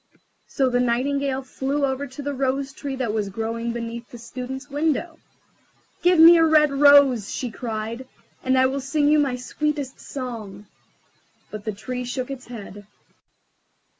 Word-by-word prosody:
So 270 - +1
the 245 -1 +1
Nightingale 265 +2 0
flew 275 +2 -1
over 270 +1 -2
to 265 +3 -9
the 285 0 -2
Rose 270 +1 -1
tree 280 -2 -5
that 250 -5 -2
was 210 -2 -1
growing 230 +3 -3
beneath 235 0 -6
the 240 - -10
Student's 260 +4 -7
window. 315 +3 -1 0.8
"Give 355 0 +4
me 335 +2 +9
a 330 - +5
red 305 -2 +5
rose," 275 -6 +5
she 250 -3 -4
cried, 225 +2 -5 0.4
"and 260 0 +2
I 260 - +5
will 270 +1 -1
sing 290 +2 +1
you 305 0 +5
my 275 -4 +1
sweetest 285 +1 -3
song." 220 -7 -7 0.9
But 215 -1 -7
the 215 - -1
Tree 250 +5 -5
shook 250 +2 -4
its 260 -2 -8
head. 205 -4 -10
260 Hz, 160 wpm, -23 LUFS, 235-285 Hz, 0.9 s, me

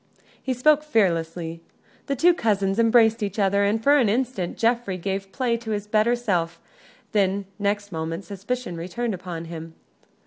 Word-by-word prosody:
He 260 -1 -2
spoke 300 +4 +4
fearlessly. 170 - 0 0.5
The 275 - 0
two 345 +7 +5
cousins 200 - 0
embraced 225 0 +4
each 200 0 -3
other, 200 0 +2
and 215 +2 +1
for 285 +3 +5
an 235 -6 +3
instant 230 -5 -1
Geoffrey 230 -5 +1
gave 195 +1 -4
play 245 -1 0
to 230 -1 -9
his 205 -1 -2
better 215 +3 +2
self; 175 -8 -1 0.5
then, 200 -1 +1
next 205 0 -1
moment, 165 +2 -4
suspicion 200 0 -4
returned 215 +7 -3
upon 175 -3 -6
him. 165 0 -8
205 Hz, 160 wpm, -24 LUFS, 180-235 Hz, 0.5 s, two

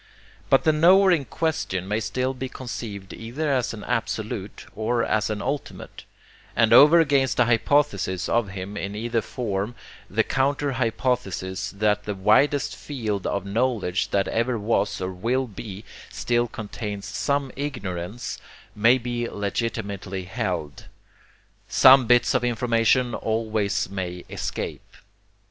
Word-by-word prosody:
But 135 - +5
the 155 - +4
knower 185 +5 +6
in 155 -6 +2
question 140 - -2
may 105 +2 0
still 125 +4 -1
be 130 0 -5
conceived 110 -7 -7
either 140 +6 -2
as 125 -3 0
an 110 -2 -8
Absolute 110 -4 -3
or 115 +2 0
as 110 -1 0
an 105 -1 -3
Ultimate; 140 +3 -5 0.5
and 115 -1 +4
over 155 +4 +8
against 140 -7 +2
the 125 - +5
hypothesis 120 -4 +1
of 120 -3 +1
him 95 +1 -6
in 100 +1 -4
either 115 +1 -1
form 105 -1 -3 0.3
the - - +2
counter 140 +1 0
hypothesis 110 -6 -1
that 105 0 +1
the 105 - -3
widest 110 +4 +3
field 110 -9 -3
of 100 -1 -2
knowledge 105 -3 0
that 100 -1 +1
ever 115 +1 0
was 105 -1 0
or 95 0 -2
will 120 +8 -1
be 105 -2 -9 0.2
still 120 0 0
contains 105 -2 -6
some 140 -2 -1
ignorance, 105 -6 -5 0.4
may 115 +5 +5
be 120 -1 -3
legitimately 100 -2 -3
held. 90 -7 -4 0.8
Some 130 -2 +7
bits 120 0 +4
of 130 -2 +1
information 120 0 +2
always 110 -1 -1
may 90 -2 -5
escape. - - -5
115 Hz, 135 wpm, -24 LUFS, 100-130 Hz, 0.8 s, over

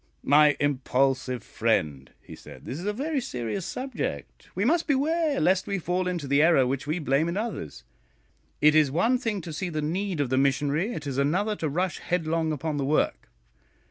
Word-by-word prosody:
"My 150 +1 +5
impulsive 130 -3 0
friend," 70 -4 -1
he - - -11
said, - - -13
"this 140 - -5
is 180 - -6
a - - +2
very 280 +6 -2
serious 125 - -4
subject; 70 - -5
we 195 +4 0
must 325 +6 +2
beware 300 +1 +1
lest 185 +1 +2
we 200 - -1
fall 180 +1 -1
into 175 -6 -3
the 140 +2 +3
error 160 -5 +5
which 135 +2 -3
we 155 +3 0
blame 150 0 +1
in 175 - -3
others. 180 - -5 0.8
It 150 0 +6
is 155 -2 +4
one 225 - +2
thing 225 -6 -2
to 165 -1 -7
see 180 +4 -3
the 155 -2 -3
need 175 +3 -2
of 135 -3 -1
the 130 - +3
missionary, 145 - +1
it 150 - -6
is 140 -1 -2
another 185 +10 +1
to 155 - -2
rush 180 +5 -1
headlong 165 -2 -1
upon 155 0 -3
the 140 - -1
work. 150 +3 0
160 Hz, 195 wpm, -26 LUFS, 140-195 Hz, 0.8 s, It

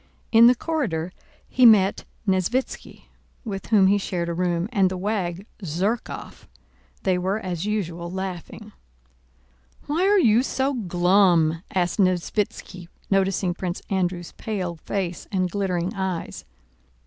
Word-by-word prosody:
In 230 +1 +8
the 250 - +6
corridor 220 - -2 0.4
he 255 - +1
met 205 -5 +6 0.2
Nesvítski, 190 +7 -1 0.4
with 195 -3 -5
whom 210 -4 +5
he 200 +2 +4
shared 175 -3 -3
a - - -2
room, 175 0 0
and 190 -2 +3
the 185 - -4
wag 190 -2 -2 0.2
Zherkóv; 190 +7 -3 0.6
they 185 -2 +1
were 190 +3 0
as 185 -2 -4
usual 170 -5 -3
laughing. 190 +3 -6 1.1
"Why 335 +6 +1
are 410 +1 +5
you 235 - +5
so 265 +1 -1
glum?" 175 -5 +3
asked 180 +2 0
Nesvítski 185 -1 -1 0.2
noticing 195 -2 +1
Prince 180 0 -5
Andrew's 180 -2 -1
pale 185 -6 -4
face 180 +1 -4
and 185 -3 0
glittering 185 -1 -1
eyes. 190 -4 -4
190 Hz, 125 wpm, -24 LUFS, 175-210 Hz, 1.1 s, In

